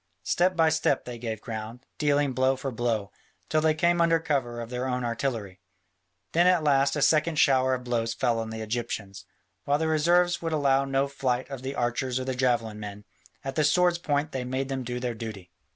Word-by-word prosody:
Step 185 Hz, +1 st, +2 dB
by 165 Hz, -1 st, +4 dB
step 160 Hz, -3 st, +1 dB
they 120 Hz, -1 st, -7 dB
gave 110 Hz, -2 st, -4 dB
ground, 115 Hz, +3 st, -7 dB
dealing 145 Hz, -2 st, +2 dB
blow 130 Hz, +1 st, +2 dB
for 135 Hz, +1 st, -4 dB
blow, 115 Hz, -4 st, -1 dB, 0.4 s
till 155 Hz, -2 st, +2 dB
they 155 Hz, 0 st, +3 dB
came 170 Hz, +2 st, +2 dB
under 165 Hz, -1 st, +4 dB
cover 135 Hz, -7 st, -1 dB
of 115 Hz, 0 st, -7 dB
their 125 Hz, +1 st, -2 dB
own 125 Hz, -1 st, -1 dB
artillery. 115 Hz, -6 st, -3 dB, 0.7 s
Then 175 Hz, +2 st, +4 dB
at 180 Hz, -3 st, +4 dB
last 140 Hz, -1 st, +3 dB
a 145 Hz, -, +1 dB
second 155 Hz, 0 st, +3 dB
shower 130 Hz, -2 st, +4 dB
of 125 Hz, -, -7 dB
blows 115 Hz, -2 st, -1 dB
fell 120 Hz, -3 st, +1 dB
on 110 Hz, 0 st, -4 dB
the 110 Hz, 0 st, -6 dB
Egyptians, 110 Hz, -4 st, -4 dB, 0.4 s
while 145 Hz, +1 st, +2 dB
the 160 Hz, +1 st, -1 dB
reserves 175 Hz, +3 st, +3 dB
would 165 Hz, -1 st, -2 dB
allow 140 Hz, -2 st, +2 dB
no 135 Hz, 0 st, +1 dB
flight 130 Hz, -2 st, -1 dB
of 135 Hz, -2 st, -6 dB
the 135 Hz, +1 st, -4 dB
archers 125 Hz, +1 st, -1 dB
or 130 Hz, -, -4 dB
the 130 Hz, -, -1 dB
javelin 120 Hz, -4 st, 0 dB
men: 105 Hz, 0 st, -8 dB, 0.4 s
at 135 Hz, -1 st, -4 dB
the 155 Hz, -, +1 dB
sword's 175 Hz, +3 st, +3 dB
point 145 Hz, -1 st, -1 dB
they 130 Hz, -1 st, -3 dB
made 130 Hz, +2 st, -3 dB
them 135 Hz, -1 st, -3 dB
do 125 Hz, 0 st, -4 dB
their 125 Hz, -1 st, -2 dB
duty. 105 Hz, -6 st, -8 dB
130 Hz, 210 wpm, -27 LUFS, 120-150 Hz, 0.7 s, by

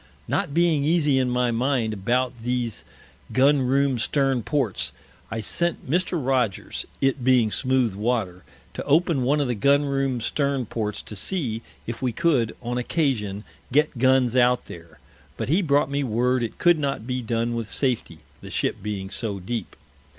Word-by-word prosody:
Not -, -, -1 dB
being 165 Hz, -2 st, +2 dB
easy 150 Hz, -3 st, +3 dB
in 130 Hz, -1 st, +1 dB
my 125 Hz, -1 st, +1 dB
Mind 120 Hz, -2 st, 0 dB
about 120 Hz, +4 st, -1 dB
these 120 Hz, -2 st, -2 dB, 0.5 s
Gun 140 Hz, +2 st, +4 dB
room 135 Hz, 0 st, +2 dB
Stern 135 Hz, +2 st, +1 dB
Ports, 105 Hz, -, -1 dB, 0.4 s
I 110 Hz, 0 st, -3 dB
sent 170 Hz, +10 st, -1 dB
Mr. 180 Hz, +7 st, 0 dB
Rogers, 130 Hz, -, -1 dB
it 135 Hz, -1 st, +1 dB
being 125 Hz, -4 st, +4 dB
smooth 130 Hz, -4 st, +1 dB
Water, 100 Hz, -4 st, -2 dB, 0.3 s
to -, -, -5 dB
open 155 Hz, -1 st, +3 dB
one 140 Hz, +4 st, +2 dB
of 140 Hz, -, +1 dB
the 125 Hz, -, 0 dB
Gun 140 Hz, +6 st, +3 dB
room 135 Hz, -2 st, 0 dB
Stern 140 Hz, +2 st, -1 dB
Ports, 105 Hz, -1 st, -3 dB
to 105 Hz, -, -6 dB
see, 115 Hz, -, -1 dB, 0.2 s
if 120 Hz, +2 st, -5 dB
we 130 Hz, -2 st, 0 dB
could, 125 Hz, -4 st, +1 dB
on 120 Hz, +1 st, -2 dB
Occasion, 115 Hz, -, -1 dB, 0.3 s
get 150 Hz, -2 st, +2 dB
Guns 130 Hz, -1 st, +3 dB
out 125 Hz, 0 st, +3 dB
there, 85 Hz, -2 st, -12 dB, 0.4 s
but -, -, -3 dB
he 170 Hz, +7 st, +3 dB
brought 145 Hz, -4 st, +2 dB
me 140 Hz, 0 st, 0 dB
Word 125 Hz, +1 st, +1 dB
it 115 Hz, -, -4 dB
could 175 Hz, -2 st, +4 dB
not 140 Hz, -6 st, -2 dB
be 125 Hz, 0 st, -2 dB
done 115 Hz, 0 st, -1 dB
with 115 Hz, -2 st, -3 dB
Safety, 130 Hz, -1 st, -1 dB, 0.2 s
the -, -, -9 dB
Ship -, -, -1 dB
being 100 Hz, -2 st, -4 dB
so 105 Hz, -4 st, -4 dB
deep. 115 Hz, +6 st, -5 dB
125 Hz, 170 wpm, -24 LUFS, 115-140 Hz, 0.5 s, Gun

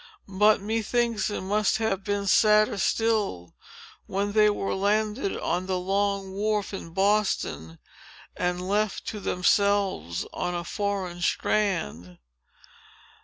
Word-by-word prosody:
But, 210 Hz, +2 st, +3 dB
methinks, 225 Hz, 0 st, 0 dB
it 205 Hz, -, -4 dB
must 205 Hz, +3 st, +1 dB
have 220 Hz, -4 st, -1 dB
been 205 Hz, 0 st, -2 dB
sadder 210 Hz, +1 st, +4 dB
still, 205 Hz, -, 0 dB, 0.5 s
when 200 Hz, +1 st, -1 dB
they 210 Hz, 0 st, +5 dB
were 205 Hz, -1 st, -2 dB
landed 210 Hz, +2 st, 0 dB
on 180 Hz, +1 st, -2 dB
the 185 Hz, -1 st, 0 dB
Long 195 Hz, +1 st, -1 dB
Wharf, 210 Hz, +1 st, -1 dB
in 190 Hz, -, -6 dB
Boston, 190 Hz, -, 0 dB, 0.6 s
and 180 Hz, 0 st, -2 dB
left 210 Hz, +1 st, -1 dB
to 210 Hz, -, -6 dB
themselves, 190 Hz, -, +1 dB
on 180 Hz, 0 st, -2 dB
a 175 Hz, -, -3 dB
foreign 190 Hz, -2 st, -3 dB
strand. 90 Hz, -, -1 dB
200 Hz, 120 wpm, -26 LUFS, 185-210 Hz, 0.6 s, they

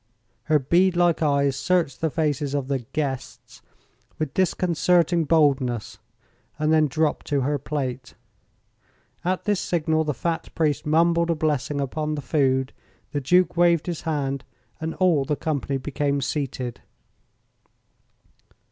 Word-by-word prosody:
Her 155 Hz, 0 st, +4 dB
bead 175 Hz, +7 st, +2 dB
like 175 Hz, -2 st, +2 dB
eyes 140 Hz, -3 st, +2 dB
searched 155 Hz, -3 st, 0 dB
the 160 Hz, -, +1 dB
faces 145 Hz, -2 st, -1 dB
of 140 Hz, -2 st, -2 dB
the 135 Hz, -1 st, 0 dB
"guests" 130 Hz, +2 st, -5 dB, 0.6 s
with 155 Hz, -4 st, -3 dB
disconcerting 175 Hz, -2 st, +2 dB
boldness, 135 Hz, -7 st, +1 dB, 0.6 s
and 155 Hz, +1 st, +1 dB
then 155 Hz, -1 st, +4 dB
dropped 155 Hz, +2 st, -1 dB
to 145 Hz, -2 st, +1 dB
her 145 Hz, +2 st, 0 dB
plate. 130 Hz, -3 st, -4 dB, 1.1 s
At 185 Hz, +1 st, -1 dB
this 205 Hz, -3 st, +1 dB
signal 160 Hz, -2 st, 0 dB
the 150 Hz, -3 st, -2 dB
fat 165 Hz, -1 st, -2 dB
priest 150 Hz, -3 st, 0 dB
mumbled 170 Hz, +2 st, +3 dB
a 170 Hz, -, +2 dB
blessing 150 Hz, -2 st, -1 dB
upon 150 Hz, +3 st, -2 dB
the 145 Hz, -, -4 dB
food, 130 Hz, -3 st, +1 dB, 0.4 s
the 145 Hz, -, -2 dB
Duke 180 Hz, +7 st, +3 dB
waved 170 Hz, -2 st, +3 dB
his 170 Hz, -3 st, -4 dB
hand, 140 Hz, -4 st, -2 dB, 0.4 s
and 160 Hz, +1 st, -4 dB
all 175 Hz, -7 st, +3 dB
the 150 Hz, +2 st, -1 dB
company 140 Hz, -2 st, -2 dB
became 140 Hz, +1 st, -1 dB
seated. 130 Hz, -3 st, -3 dB
150 Hz, 135 wpm, -24 LUFS, 140-165 Hz, 1.1 s, Her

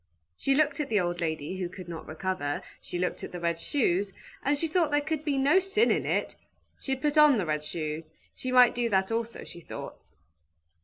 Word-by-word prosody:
She 270 Hz, -, +1 dB
looked 305 Hz, +1 st, +2 dB
at 300 Hz, -, -2 dB
the 215 Hz, -2 st, +3 dB
old 175 Hz, -1 st, -1 dB
lady, 160 Hz, +2 st, -2 dB
who 180 Hz, -2 st, -3 dB
could 185 Hz, -1 st, -10 dB
not 165 Hz, -2 st, -7 dB
recover, 160 Hz, -3 st, -2 dB, 0.2 s
she -, -, -5 dB
looked 180 Hz, 0 st, -2 dB
at -, -, -6 dB
the 180 Hz, -, -6 dB
red 170 Hz, -1 st, -1 dB
shoes, 200 Hz, -5 st, +1 dB, 0.3 s
and 285 Hz, +1 st, +2 dB
she 330 Hz, -, 0 dB
thought 325 Hz, 0 st, +2 dB
there 290 Hz, 0 st, +3 dB
could 310 Hz, 0 st, -2 dB
be 290 Hz, -3 st, 0 dB
no 280 Hz, +7 st, +5 dB
sin 390 Hz, +4 st, +2 dB
in -, -, 0 dB
it; -, -, 0 dB, 0.4 s
she 270 Hz, -, -1 dB
put 295 Hz, +3 st, +1 dB
on 300 Hz, -4 st, +7 dB
the 195 Hz, -, 0 dB
red 150 Hz, -1 st, -1 dB
shoes, 155 Hz, 0 st, -4 dB, 0.2 s
she 255 Hz, -, -5 dB
might 250 Hz, -1 st, +7 dB
do 240 Hz, -1 st, 0 dB
that 190 Hz, 0 st, +1 dB
also, 230 Hz, 0 st, -2 dB
she -, -, -10 dB
thought. -, -, -8 dB
220 Hz, 215 wpm, -28 LUFS, 175-290 Hz, 0.4 s, on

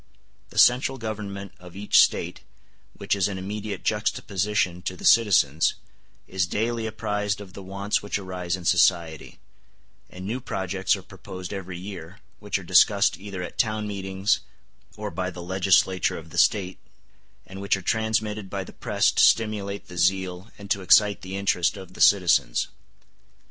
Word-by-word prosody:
The -, -, -13 dB
central 130 Hz, +2 st, +4 dB
government 100 Hz, -4 st, -6 dB
of 90 Hz, -1 st, -13 dB
each 105 Hz, +1 st, +5 dB
State, 85 Hz, +1 st, 0 dB, 0.6 s
which -, -, 0 dB
is 100 Hz, -2 st, +1 dB
in 100 Hz, -2 st, -5 dB
immediate 100 Hz, +1 st, -5 dB
juxtaposition 100 Hz, -3 st, -1 dB
to 90 Hz, -, -4 dB
the -, -, -8 dB
citizens, 90 Hz, -10 st, +4 dB, 0.5 s
is 95 Hz, -1 st, -1 dB
daily 115 Hz, +4 st, -1 dB
apprised 105 Hz, -1 st, -2 dB
of 100 Hz, -3 st, -11 dB
the 100 Hz, -, -9 dB
wants 100 Hz, +2 st, -2 dB
which 105 Hz, -, -2 dB
arise 90 Hz, -3 st, -4 dB
in 90 Hz, -2 st, -10 dB
society; 85 Hz, -3 st, +2 dB, 0.7 s
and 90 Hz, +1 st, -9 dB
new 115 Hz, +6 st, -3 dB
projects 95 Hz, -5 st, -1 dB
are -, -, -10 dB
proposed 95 Hz, +1 st, -9 dB
every 95 Hz, -2 st, -6 dB
year, 90 Hz, -1 st, -9 dB, 0.2 s
which 105 Hz, -1 st, -2 dB
are 95 Hz, -, -9 dB
discussed 95 Hz, +4 st, +4 dB
either 95 Hz, -2 st, -6 dB
at -, -, -9 dB
town 110 Hz, -3 st, 0 dB
meetings 95 Hz, 0 st, -1 dB, 0.6 s
or -, -, -5 dB
by 90 Hz, -1 st, -3 dB
the 90 Hz, -1 st, -8 dB
legislature 95 Hz, 0 st, +2 dB
of 80 Hz, -1 st, -11 dB
the -, -, -1 dB
State, 95 Hz, -3 st, +2 dB, 0.7 s
and 95 Hz, +1 st, -9 dB
which 100 Hz, 0 st, +1 dB
are 95 Hz, -, -9 dB
transmitted 110 Hz, -1 st, -1 dB
by 100 Hz, 0 st, -3 dB
the -, -, -13 dB
press -, -, +1 dB
to -, -, +2 dB
stimulate 105 Hz, -3 st, +2 dB
the 90 Hz, -1 st, -7 dB
zeal 95 Hz, +2 st, 0 dB
and 100 Hz, -1 st, -10 dB
to 100 Hz, -4 st, +1 dB
excite 100 Hz, +2 st, +4 dB
the 95 Hz, +1 st, -6 dB
interest 95 Hz, -1 st, +1 dB
of 95 Hz, -2 st, -11 dB
the -, -, -8 dB
citizens. 90 Hz, -11 st, +4 dB
95 Hz, 165 wpm, -25 LUFS, 90-105 Hz, 0.7 s, each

